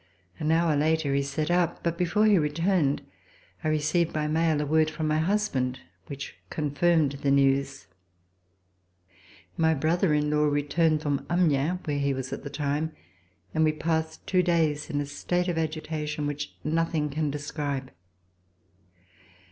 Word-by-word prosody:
An 155 - 0
hour 165 -1 +3
later 155 -1 +1
he 140 - +2
set 140 +4 -2
out, 175 -1 +1
but 170 -1 0
before 180 +5 +2
he 205 -4 +5
returned 155 0 +1 0.6
I - - -1
received 155 +2 +1
by 155 -1 -1
mail 160 0 +1
a 150 - 0
word 155 +1 +3
from 155 0 -3
my 155 0 +1
husband 160 -9 0 0.3
which 140 -1 -7
confirmed 155 0 +2
the 140 - +1
news. 135 0 +2 1.7
My 160 -1 +3
brother 160 +3 +2
in 150 0 +1
law 150 0 +3
returned 150 +2 +1
from 145 -2 -1
Amiens, 175 0 +2
where 145 -2 -1
he 140 -1 +1
was 130 -1 -4
at - - -6
the 140 - -5
time, 145 +2 -2 0.6
and 160 - +2
we 155 -1 +3
passed 160 0 -2
two 185 -1 +3
days 165 -4 +1
in 145 -2 -1
a - - -3
state 175 +5 -2
of 170 -2 0
agitation 155 -1 -3
which 145 0 -4
nothing 160 -1 0
can 155 +1 -1
describe. 145 -2 -4
155 Hz, 155 wpm, -27 LUFS, 145-165 Hz, 1.7 s, he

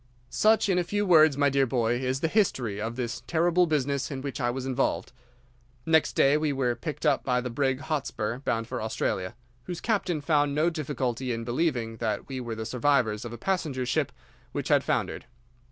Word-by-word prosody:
"'Such, 220 0 +3
in 185 -2 +2
a - - +1
few 205 +4 -1
words, 155 -6 +6
my 145 0 +4
dear 135 -1 +2
boy, 120 -1 +1
is 130 +1 -1
the 165 - +2
history 130 - 0
of 115 +2 -3
this 120 -1 -3
terrible 175 +2 +3
business 140 -3 0
in 135 -3 -4
which 140 0 -5
I 120 - +1
was 130 +1 -3
involved. 135 0 -1 0.7
Next 160 -1 +3
day 140 +2 +4
we 155 -1 0
were 130 -3 0
picked 150 +7 -5
up 145 -3 +3
by 125 -1 +1
the 125 0 -4
brig 130 +1 0
Hotspur, 140 -7 -2
bound 115 -4 -1
for - - -4
Australia, 105 -2 -2 0.3
whose 175 -2 -5
captain 195 -7 0
found 145 -1 +1
no 160 +3 +2
difficulty 130 -5 -2
in 115 0 -3
believing 120 -3 -1
that 110 -2 -2
we 135 -1 -5
were 120 -2 -4
the 110 0 -5
survivors 120 -3 +1
of 120 - -6
a 120 - -7
passenger 150 - -1
ship 130 - 0 0.4
which - - -3
had - - +4
foundered. - - -1
135 Hz, 200 wpm, -27 LUFS, 120-155 Hz, 0.7 s, words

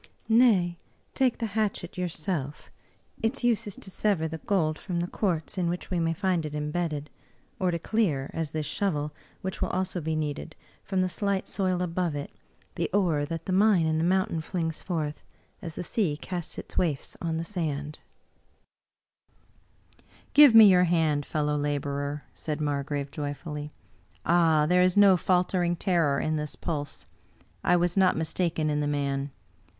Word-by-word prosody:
" - - -39
Nay, 210 -8 +4 0.3
take 260 -3 +2
the 230 - -2
hatchet 205 -5 -1
yourself; 160 -4 -4 0.5
its 235 +4 -1
use 230 -2 +2
is 205 - -6
to 190 - -10
sever 190 -6 +1
the 160 0 -6
gold 160 -4 0
from 180 -4 -3
the 170 - 0
quartz 180 -2 -2
in 175 -2 +1
which 175 +2 -4
we 180 - +1
may 165 0 +1
find 185 -1 0
it 150 -1 -5
imbedded, 150 0 -2 0.5
or 185 - +2
to 170 - 0
clear, 165 -8 0
as 165 -2 -2
this 155 +1 -3
shovel, 150 -5 -1 0.3
which 190 0 -4
will - - 0
also 185 -1 -2
be 160 +1 -2
needed, 155 +1 -3 0.3
from 190 -2 0
the - - +1
slight 195 +1 -1
soil 185 -2 0
above 175 -2 -1
it, 145 - -5 0.4
the - - -2
ore 175 -7 +2
that 165 +1 -5
the 185 - -1
mine 195 -3 +4
in 160 0 +1
the - - +1
moim 190 +4 +2
tain 165 - -2
flings 160 -1 -3
forth, 155 -5 -3 0.4
as 165 -2 -7
the - - -4
sea 175 -6 0
casts 175 -3 -5
its - - -3
waifs 155 -6 -1
on 165 -1 -1
the 165 - -2
sands." 150 -5 -3 0.8
" - - -34
Give 290 -5 +8
me 225 -1 +11
your 180 -2 +6
hand, 160 -4 +1
fellow 150 -1 0
laborer! 145 0 -2
" - - -35
said 150 -1 -4
Margrave, 145 -1 -2
joyfully. 150 0 -5 0.3
" - - -32
Ah, 165 -3 +4
there 180 +3 +4
is 185 +1 +3
no 200 -2 +7
faltering 180 0 +1
terror 165 -6 +1
in 155 0 0
this 150 -1 -4
pulse! 145 -4 -4 0.6
I 180 - +4
was 175 0 +1
not 190 -2 +4
mistaken 160 -1 0
in 150 - 0
the 145 - 0
man. 140 -1 -1
170 Hz, 175 wpm, -27 LUFS, 150-185 Hz, 0.8 s, me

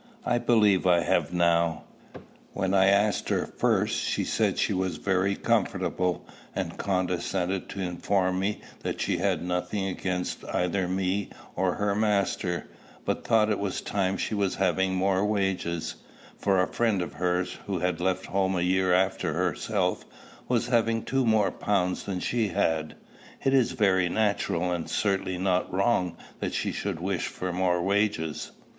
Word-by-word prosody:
"I 120 -1 +2
believe 105 -6 +3
I 85 -1 +5
have - - +1
now. 85 -2 +2 0.7
When 95 0 -1
I 95 0 +5
asked 100 0 +2
her - - +1
first, - - +1
she - - -1
said - - 0
she - - +1
was 95 -3 -1
very 95 +3 +1
comfortable, 90 -1 0 0.3
and - - -3
condescended 90 0 -1
to 100 - -5
inform 95 +1 0
me 100 +2 -1 0.2
that - - -4
she 95 -2 0
had 95 -1 0
nothing 90 +3 -2
against 90 -1 -3
either 90 +1 0
me 95 +2 -1 0.3
or 90 -1 +1
her 105 -1 0
master, 100 -4 0 0.4
but - - -1
thought 110 -1 +3
it 105 - 0
was 100 -2 -2
time 95 -1 -1
she - - -2
was 100 -2 0
having 95 0 +1
more 95 +1 +2
wages; 95 -5 -1 0.4
for 95 -2 +1
a - - -5
friend 110 -6 +1
of - - -7
hers, 90 0 -1
who 100 -2 -1
had 90 -1 -1
left 95 0 0
home 95 0 0
a 90 - 0
year 95 +1 +2
after 95 +1 +1
herself, - - 0 0.4
was 120 -1 +1
having 115 -2 +2
two 135 -2 0
more 110 -3 +3
pounds 90 -3 0
than 95 -2 -3
she 115 +3 0
had." 80 -6 0 0.5
"It 135 - +2
is 130 -3 +3
very 95 -3 +3
natural, 90 -4 0
and 85 -2 -3
certainly 95 -3 0
not 90 0 0
wrong, 95 -3 +1 0.2
that - - -3
she - - -1
should 100 -5 -3
wish 95 0 -1
for 90 -1 -4
more 90 -1 +1
wages." 100 -5 0
95 Hz, 160 wpm, -27 LUFS, 90-100 Hz, 0.7 s, I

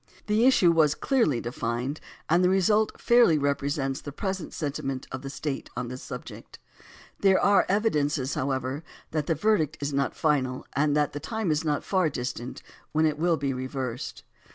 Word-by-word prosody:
The 215 +4 +3
issue 185 -10 +5
was 155 -3 +3
clearly 230 - +1
defined 120 +4 -3 0.3
and 170 +3 +3
the 180 - +4
result 210 +3 +2
fairly 235 -10 +5
represents 140 -1 -1
the 145 - -7
present 190 +3 -4
senti 145 -3 -3
ment 135 -1 -3
of 130 - -5
the 135 - -6
State 135 0 -4
on 125 -1 -3
this 125 +1 -7
subject. - - -9 0.6
There 195 -1 +4
are 200 0 +4
evidences, 150 - +1
however, 130 +2 -2 0.3
that 155 -2 -1
the 165 - +2
verdict 165 -4 +1
is 145 0 -3
not 140 0 0
final 130 -5 0
and 145 +1 +2
that 150 -1 +1
the 145 - -4
time 220 0 -2
is 150 +1 0
not 150 -2 0
far 185 -5 +1
distant 125 -2 -5 0.3
when 155 +1 +3
it 150 -1 0
will 170 0 +2
be 140 -1 -1
reversed. 130 -1 -5
150 Hz, 175 wpm, -27 LUFS, 135-175 Hz, 0.6 s, issue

